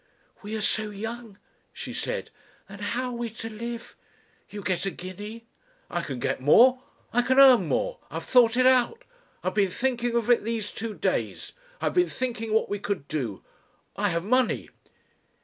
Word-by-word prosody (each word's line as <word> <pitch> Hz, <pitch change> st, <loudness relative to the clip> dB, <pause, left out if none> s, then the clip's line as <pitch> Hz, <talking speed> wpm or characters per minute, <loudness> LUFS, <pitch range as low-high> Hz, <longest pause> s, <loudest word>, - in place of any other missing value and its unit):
"We 215 Hz, +1 st, -5 dB
are 220 Hz, -, -2 dB
so 215 Hz, +1 st, 0 dB
young," 225 Hz, +1 st, -7 dB, 0.3 s
she -, -, -7 dB
said. -, -, -3 dB, 0.4 s
"And 200 Hz, +1 st, -11 dB
how 245 Hz, +5 st, -2 dB
are 240 Hz, -, -5 dB
we 235 Hz, -1 st, -3 dB
to 225 Hz, 0 st, -7 dB
live? 235 Hz, +2 st, -6 dB, 0.5 s
You 205 Hz, -1 st, -7 dB
get 185 Hz, +1 st, 0 dB
a -, -, +2 dB
guinea." 205 Hz, +5 st, -8 dB, 0.5 s
"I 175 Hz, -, -1 dB
can 145 Hz, -6 st, -5 dB
get 120 Hz, -, -2 dB
more 250 Hz, -, +6 dB, 0.3 s
I 245 Hz, -, +4 dB
can 260 Hz, +2 st, +1 dB
earn 255 Hz, -9 st, +8 dB
more, -, -, -1 dB
I -, -, -10 dB
have -, -, -3 dB
thought 245 Hz, -2 st, +5 dB
it 255 Hz, -, +4 dB
out. 260 Hz, -, +4 dB, 0.4 s
I 185 Hz, -, +1 dB
have -, -, -10 dB
been 200 Hz, -2 st, +2 dB
thinking 240 Hz, +2 st, -1 dB
of 235 Hz, -2 st, +1 dB
it 240 Hz, -, +4 dB
these 220 Hz, -2 st, -2 dB
two 220 Hz, 0 st, -5 dB
days. -, -, -2 dB, 0.3 s
I -, -, -3 dB
have -, -, +1 dB
been 360 Hz, 0 st, +3 dB
thinking 230 Hz, -3 st, -3 dB
what 220 Hz, -, +2 dB
we 205 Hz, -, -3 dB
could 195 Hz, -8 st, -3 dB
do. 125 Hz, -11 st, -3 dB, 0.5 s
I 205 Hz, 0 st, +1 dB
have 170 Hz, -1 st, -1 dB
money." 255 Hz, +4 st, +1 dB
225 Hz, 190 wpm, -26 LUFS, 200-245 Hz, 0.5 s, earn